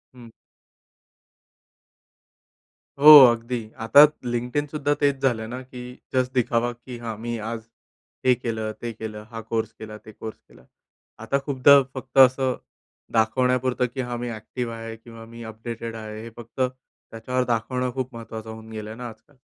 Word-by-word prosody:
हं. 120 -2 -13 2.7
हो. 150 +2 +11
अगदी. 120 +1 -3 0.3
आता 140 +5 +9 0.3
LinkedIn 125 +5 -2
सुद्धा 145 -1 +1
तेच 140 -2 +2
झालं 110 -4 0
ना 125 - -4
की 125 - -7 0.3
जस्ट 130 0 +1
दिखावा 120 0 +1
की 125 0 -9
"हा, 115 -1 -4
मी 120 - -2 0.2
आज 115 -1 -4 0.6
हे 130 - +6
केलं, 110 -3 -3
ते 120 -1 -4
केलं, 105 -1 -6
हा 115 - -5
कोर्स 110 -1 -1
केला, 105 -1 -8
ते - - -9
कोर्स 110 -1 -7
केला." 65 - -19 0.6
आता 140 +5 +1
खूपदा 140 0 +6 0.2
फक्त 130 +1 -8
असं 130 0 0 0.6
दाखवण्यापुरतं 125 +2 +1
की, 130 - -2
"हा, 120 - -2
मी - - -3
ॲक्टिव्ह 120 +1 -5
आहे 115 0 -7
किंवा 115 0 -13
मी 115 - -8
अपडेटेड 115 +1 -6
आहे." 110 0 -7
हे - - -7
फक्त 115 +2 -15
त्याच्यावर 125 -1 -3
दाखवणं 125 +3 -2
खूप 130 -1 -4
महत्त्वाचं 110 -1 -8
होऊन 110 0 -10
गेलं 110 +1 -7
ना 125 0 -6
आजकाल. 120 +5 -30
120 Hz, 155 wpm, -24 LUFS, 110-130 Hz, 2.7 s, हो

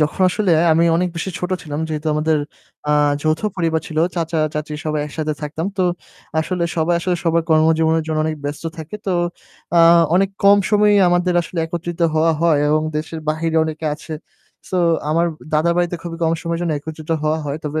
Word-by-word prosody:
যখন 155 +5 0
আসলে 195 0 0 0.2
আমি 165 +2 +3
অনেক 180 +1 +1
বেশি 180 +3 -3
ছোট 180 +1 -4
ছিলাম 150 -2 -5
যেহেতু 155 0 -4
আমাদের, 155 +1 +1 0.5
আ - - +3 0.3
যৌথ 155 0 +1 0.2
পরিবার 165 -3 0
ছিল 155 - -4 0.2
চাচা, 165 -2 -1 0.2
চাচী 150 0 -4
সবাই 155 -1 -1
একসাথে 155 +1 -3
থাকতাম। 155 +4 -3
তো 185 - +1 0.6
আসলে 175 +2 -1
সবাই 165 +2 +2
আসলে 180 0 0
সবার 165 0 +2
কর্মজীবনের 160 +1 +3
জন্য 155 -1 -1
অনেক 155 0 -2
ব্যস্ত 145 +3 -5
থাকে। 160 +6 -7
তো, 190 - +1 0.6
আ - - +7 0.4
অনেক 195 +1 +3
কম 200 +1 +7
সময়েই 210 -1 +4
আমাদের 175 0 +1
আসলে 170 +1 -7
একত্রিত 170 +1 -5
হওয়া 160 +1 +3
হয় 165 -3 +3
এবং 155 +1 +2
দেশের 160 +1 -4
বাহিরে 160 +1 0
অনেকে 160 0 -4
আছে। 155 +1 -10 0.6
So 185 - -2 0.3
আমার 165 +2 +2 0.3
দাদার 155 +3 +3
বাড়িতে 175 0 0
খুবই 170 -1 -6
কম 165 0 +2
সময়ের 170 0 -2
জন্য 170 -2 0
একত্রিত 155 +1 -8
হওয়া 155 +1 +1
হয়। 145 +1 -3
তবে 150 +1 -2
160 Hz, 185 wpm, -19 LUFS, 155-175 Hz, 0.6 s, আ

